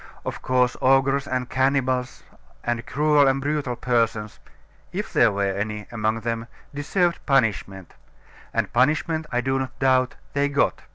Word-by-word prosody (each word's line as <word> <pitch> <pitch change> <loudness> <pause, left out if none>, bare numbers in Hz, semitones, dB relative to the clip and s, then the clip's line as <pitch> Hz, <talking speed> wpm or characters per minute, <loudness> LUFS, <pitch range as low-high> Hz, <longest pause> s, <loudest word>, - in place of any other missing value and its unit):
Of - - -5
course, 125 -1 +2
ogres 135 +1 +3
and 130 -1 -2
cannibals, 130 -1 0 0.4
and 120 0 -1
cruel 150 -1 +3
and 135 0 +2
brutal 140 -3 -2
persons 115 -3 -1 0.5
(if - - -4
there 115 - +5
were 100 -1 0
any 105 +1 -4
among 110 -1 -1
them), 115 0 -3 0.3
deserved 170 +5 0
punishment 105 - 0 0.6
and - - -1
punishment, 155 +5 +1
I 125 -1 +1
do 135 +1 0
not 130 -1 -5
doubt, 130 -1 +2 0.2
they 145 0 +1
got. 140 0 +1
130 Hz, 145 wpm, -24 LUFS, 115-140 Hz, 0.6 s, there